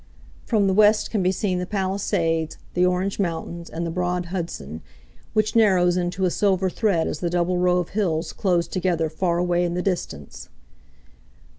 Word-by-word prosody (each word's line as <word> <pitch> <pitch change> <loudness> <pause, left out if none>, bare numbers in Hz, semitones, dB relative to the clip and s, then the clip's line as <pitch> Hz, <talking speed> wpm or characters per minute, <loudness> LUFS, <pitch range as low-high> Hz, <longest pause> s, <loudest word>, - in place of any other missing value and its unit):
From 215 -4 +2
the 190 - +2
west 210 +2 +4
can 210 - 0
be 185 0 +2
seen 185 -1 -1
the 180 - -4
Palisades, 190 -5 -1 0.2
the 180 - +2
Orange 180 +2 0
Mountains, 170 -2 -3
and 170 +2 -4
the 165 - -3
broad 180 0 -1
Hudson, 170 - -5 0.5
which 215 0 +1
narrows 185 -6 +4
into 180 +1 -1
a 180 - +1
silver 190 -2 +1
thread 195 -7 +1
as - - -4
the 175 - -1
double 175 +1 0
row 180 0 +3
of 180 -2 -1
hills 175 -6 -1
close 175 -3 +1
together 175 -4 0
far 170 +1 0
away 175 0 +1
in 175 0 -1
the 180 - -1
distance. 170 - -4
180 Hz, 175 wpm, -23 LUFS, 170-190 Hz, 0.5 s, west